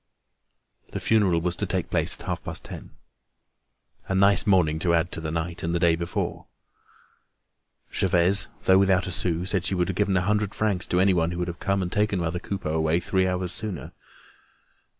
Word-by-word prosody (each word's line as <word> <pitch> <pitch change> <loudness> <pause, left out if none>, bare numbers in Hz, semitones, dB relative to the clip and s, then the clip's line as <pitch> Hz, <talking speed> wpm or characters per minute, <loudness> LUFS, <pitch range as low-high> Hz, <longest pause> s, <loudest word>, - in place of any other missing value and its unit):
The - - -3
funeral 100 -7 +2
was 90 +1 -2
to - - -2
take - - -3
place - - +1
at - - -10
half - - -4
past - - -7
ten. - - -9 1.2
A 95 - -1
nice 100 0 +5
morning 85 -6 +2
to 85 0 +2
add 85 +1 0
to 80 - -2
the 80 - -4
night 85 +1 -3
and 85 +1 -2
the - - 0
day 85 -1 +3
before! 85 +1 -4 1.5
Gervaise, 90 +1 +3 0.2
though 95 0 +5
without 95 -1 +2
a 90 - -4
sou, 85 0 0
said 95 -2 0
she 95 - 0
would 90 +1 0
have 95 - -3
given 100 -1 +1
a - - +1
hundred 105 +1 -1
francs 105 -4 -1
to 90 - 0
anybody 90 -3 +2
who - - -5
would 90 - -2
have 85 -1 -6
come 100 -1 -1
and 90 - -5
taken 105 0 0
mother 85 0 -2
Coupeau 95 -4 -4
away 80 +1 +1
three 95 +1 0
hours 90 -1 0
sooner. 95 -11 -1
90 Hz, 195 wpm, -25 LUFS, 85-95 Hz, 1.5 s, nice